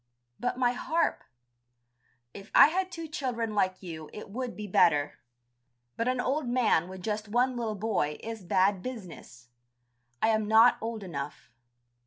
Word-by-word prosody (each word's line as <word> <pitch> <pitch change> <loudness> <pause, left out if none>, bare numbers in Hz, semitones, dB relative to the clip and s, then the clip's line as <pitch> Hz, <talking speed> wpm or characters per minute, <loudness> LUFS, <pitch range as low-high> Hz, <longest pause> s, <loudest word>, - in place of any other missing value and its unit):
"But 245 - -2
my 245 -1 +3
harp...." 325 +6 -1 1.1
"If 200 +1 -11
I - - +9
had 370 +2 -1
two 330 -2 -6
children 245 -7 -3
like 185 -2 0
you 160 -4 -7
it 210 - -9
would 250 +2 -5
be 210 - -5
better. 150 -6 +2 0.8
But 230 - -1
an 255 0 0
old 270 +2 -1
man 235 -9 +2
with 190 -1 -9
just 215 +1 -3
one 245 +4 +1
little 225 -3 -2
boy 195 -8 -1
is 225 -2 -6
bad 185 +2 +2
business. 180 - -9 0.7
I 220 - +2
am 220 -1 +1
not 225 +3 +6
old 225 -2 -4
enough. 145 -6 -7
220 Hz, 155 wpm, -29 LUFS, 185-245 Hz, 1.1 s, I